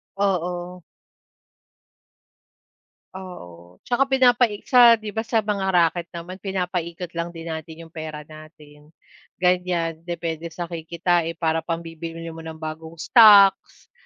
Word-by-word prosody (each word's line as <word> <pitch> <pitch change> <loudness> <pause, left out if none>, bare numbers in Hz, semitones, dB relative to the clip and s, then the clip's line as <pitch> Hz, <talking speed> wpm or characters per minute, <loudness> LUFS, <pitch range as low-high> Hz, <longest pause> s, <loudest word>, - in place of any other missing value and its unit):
Oo. 180 -2 -2 2.3
Oo, 90 - -11
tsaka 260 +3 +1
pinapaig 245 -5 +3
sa 240 -2 +7
'di 215 -2 -8
ba 220 - -4
sa 225 -1 0
mga 200 -2 -2
raket 170 0 +2
naman 180 +3 -8
pinapikot 180 -3 -4
lang 170 0 -3
din 165 - -8
natin 160 +1 -8
yung 165 - -16
pera 155 -2 -7
natin, 150 -1 -15 0.5
ganyan. 180 -3 0
Depende 170 -1 -4
sa 175 +2 -6
kikitain 170 0 -1
para 165 -1 0
pambibili 165 0 -6
mo 165 - -10
ng 160 0 -8
bagong 160 +1 -8
stocks, 200 +1 +5
170 Hz, 120 wpm, -23 LUFS, 160-190 Hz, 2.3 s, sa